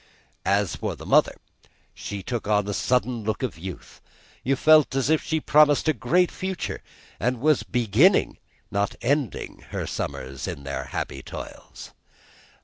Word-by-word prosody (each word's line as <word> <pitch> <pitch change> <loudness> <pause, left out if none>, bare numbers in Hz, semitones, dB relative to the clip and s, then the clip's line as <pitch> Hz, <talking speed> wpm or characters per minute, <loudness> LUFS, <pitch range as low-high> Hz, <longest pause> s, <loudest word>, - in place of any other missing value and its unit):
As 100 -1 +2
for - - -3
the - - -11
mother, - - +4 0.6
she 100 -2 -6
took 120 +1 -4
on 105 -1 +2
a 100 - -2
sudden 125 0 0
look 110 +5 -2
of 115 -10 -3
youth; 90 +1 -9 0.4
you 135 +2 +2
felt 155 -1 +5
as 135 +2 +1
if 160 - +3
she 160 -1 -1
promised 150 0 +4
a 155 - +4
great 160 +9 +2
future, 190 -1 -4 0.4
and 125 +3 0
was 150 +2 +3
beginning, 125 - +3 0.3
not 100 0 0
ending, 140 -2 -1
her - - -3
summers 65 +1 -5
and 70 - -6
their 70 0 -4
happy 65 - -4
toils. - - -9
125 Hz, 150 wpm, -25 LUFS, 100-150 Hz, 0.6 s, felt